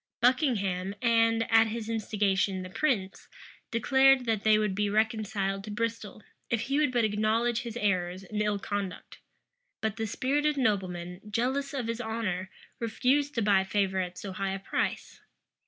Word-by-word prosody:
Buckingham, 205 - +1
and, 230 -1 +3
at 225 0 +6
his 220 0 -4
instigation, 200 -4 0
the 185 - -9
prince, 205 -8 -1 0.4
declared 265 +2 +4
that 225 -3 0
they 215 -1 +5
would 210 -2 0
be 205 +1 0
reconciled 210 -2 0
to - - -8
Bristol, 215 -1 -4 0.3
if 230 -2 0
he 275 +5 0
would 295 -3 +2
but 240 -3 +2
acknowledge 220 +3 +1
his 235 -1 -6
errors 185 -3 0
and 210 +2 -3
ill 210 -1 +1
conduct: 200 -2 -5 0.6
but 220 -2 -2
the 220 - -2
spirited 290 +6 0
nobleman, 185 -7 -1
jealous 260 +6 -1
of 265 -5 -3
his 230 +1 -3
honor, 215 -5 -3 0.3
refused 265 +5 +1
to 230 - +1
buy 200 -2 +4
favor 190 -1 0
at 180 -1 -3
so 195 +1 -6
high 195 +1 -2
a - - -5
price. 195 - -3
215 Hz, 160 wpm, -29 LUFS, 195-235 Hz, 0.6 s, at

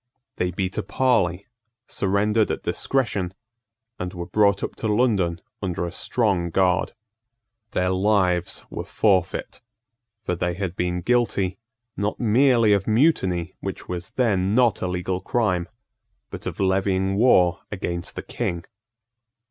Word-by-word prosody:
They 90 - 0
beat 95 +1 -2
a - - +1
parley, 100 -4 +1 0.4
surrendered 105 +3 +1
at - - -3
discretion, 100 -9 -1 0.6
and 90 +1 -4
were 85 -1 -4
brought 100 +2 +2
up - - -4
to 110 - -2
London 105 -7 +1 0.2
under 90 -3 -2
a 85 - -4
strong 95 -4 0
guard. 90 0 +1 0.8
Their 90 -2 0
lives 95 -2 +1
were - - -4
forfeit: 95 -5 0 0.6
for - - 0
they 90 0 -1
had 95 -2 -3
been 90 -1 -1
guilty, 100 -5 +1 0.4
not 105 +1 -2
merely 120 -1 +4
of 100 -1 0
mutiny, 95 - +2
which 95 -1 -6
was 90 +2 -4
then 105 -5 +1
not 120 -5 +3
a 90 - 0
legal 90 +1 -2
crime, 95 -6 0 0.6
but - - -6
of - - -5
levying 95 0 +1
war 95 -5 +4
against 85 -4 -4
the - - -5
King. 85 -1 -3
95 Hz, 135 wpm, -23 LUFS, 90-105 Hz, 0.8 s, merely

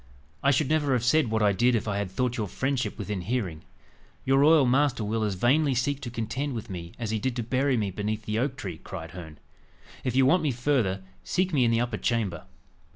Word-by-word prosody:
I 140 - +3
should 140 +1 +2
never 150 -2 +1
have 120 -2 +1
said 130 0 +3
what 110 0 +1
I 105 - +5
did 120 +5 +3
if 110 - -1
I 100 -1 -1
had 100 -2 -2
thought 125 +6 -1
your 110 -4 -2
friendship 130 +6 -2
within 105 -2 -3
hearing." 95 -7 -2 0.6
"Your 135 +1 +4
royal 150 0 +6
master 130 -2 +2
will 110 +2 -1
as 105 -3 0
vainly 135 +7 +2
seek 140 +3 0
to 125 - -5
contend 120 +4 -3
with 110 -3 -6
me 85 -2 -7
as 115 -3 -3
he 110 - 0
did 125 +3 -2
to 120 - -2
bury 130 +3 +1
me 105 -3 -1
beneath 105 +2 -3
the 110 +1 -1
oak 130 +2 -1
tree," 90 -9 -6
cried 80 -3 -8
Herne. 80 -4 -9 0.7
"If 125 -2 -1
you 135 0 +5
want 175 +7 +4
me 155 - +1
further, 120 -7 0 0.2
seek 185 -1 0
me 130 -4 +4
in - - +3
the 115 0 +2
upper 120 - -2
chamber." 105 -9 -1
120 Hz, 230 wpm, -27 LUFS, 105-135 Hz, 0.7 s, royal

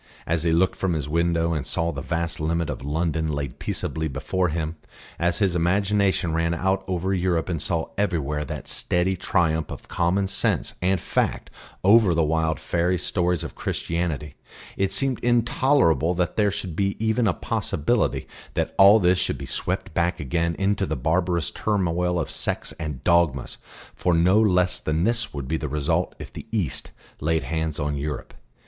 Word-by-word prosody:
As 85 -1 0
he 85 0 +1
looked 90 +3 +3
from 95 -2 0
his 75 -3 -2
window 85 +1 +1
and 75 -4 -2
saw 85 +5 -1
that 70 - -6
vast 85 -1 -2
limit 85 +1 0
of - - -6
London 80 +2 -1
laid 70 -1 -4
peaceably 80 0 -3
before 90 +6 -1
him, 80 0 -2 0.4
as 85 0 +1
his 95 -4 +1
imagination 95 0 +1
ran 85 +1 +1
out 95 +2 0
over 95 +1 -1
Europe 90 -2 0
and 85 -4 -2
saw 85 -4 -1
everywhere 75 -7 0
that - - -6
steady 90 +2 +1
triumph 80 -3 0
of - - -8
common 90 +3 +1
sense 95 - 0
and 95 +1 +2
fact - - -1 0.3
over 100 -2 +6
the 80 - +3
wild 80 +1 +1
fairy 90 +1 0
stories 90 -2 0
of - - -6
Christianity, 80 -4 -3 0.4
it 95 0 0
seemed 135 -3 0
intolerable 120 - +3
that 85 -2 -1
there 105 -1 +3
should 95 -4 -5
be 100 +1 0
even 110 +1 +1
a 95 - +3
possibility 110 +10 -1 0.3
that - - -1
all 100 +3 +8
this 90 -1 +3
should - - -1
be - - -6
swept - - -3
back 85 +1 0
again 85 +4 -1
into 100 0 +1
the - - -1
barbarous 85 +4 0
turmoil 90 -4 0
of - - -3
sects - - -2
and 75 -5 -5
dogmas; 85 -7 +2 0.3
for 90 -2 +1
no 90 +6 +4
less 90 -4 +3
than 80 +2 -1
this 120 +2 0
would 70 -3 -5
be 80 - 0
the 75 -2 -4
result 80 +5 0
if - - -10
the - - -9
East 100 - -1 0.3
laid 80 0 0
hands 80 +2 -2
on 75 0 -1
Europe. 75 0 -4
85 Hz, 175 wpm, -24 LUFS, 80-95 Hz, 0.4 s, all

